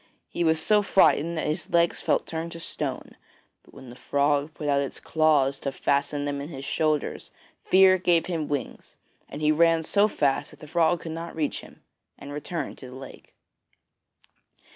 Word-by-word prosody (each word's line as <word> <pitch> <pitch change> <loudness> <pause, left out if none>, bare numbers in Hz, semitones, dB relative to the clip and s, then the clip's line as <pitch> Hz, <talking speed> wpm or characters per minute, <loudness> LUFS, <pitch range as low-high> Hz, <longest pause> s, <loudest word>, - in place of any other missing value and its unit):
He 175 - -2
was 160 -1 +2
so 210 +5 +3
frightened 170 -4 +3
that - - -2
his 155 +3 -3
legs 170 0 +2
felt - - +1
turned 165 +1 -5
to 170 - -8
stone; - - -5 0.5
but - - -22
when 130 -2 -12
the - - -12
frog 145 +2 0
put 150 - -5
out 140 -1 +2
its 140 - -5
claws 150 -4 +2
to 140 - -3
fasten 140 +1 -1
them 140 -1 -3
in 145 - -7
his 135 -4 -8
shoulders, 155 -1 -1 0.3
fear 185 0 +5
gave 175 -2 +2
him 165 -4 -3
wings, 145 -2 -5 0.3
and 150 - -7
he 150 - +4
ran 165 +1 +3
so 200 +6 +3
fast 140 -9 0
that - - -16
the - - -11
frog 165 +2 +1
could 165 - -6
not 165 +1 -6
reach 155 -2 -2
him, - - -17 0.3
and 140 0 -9
returned 150 +3 -5
to 130 - -10
the 125 - -11
lake. 135 0 -12
155 Hz, 185 wpm, -26 LUFS, 140-170 Hz, 0.5 s, fear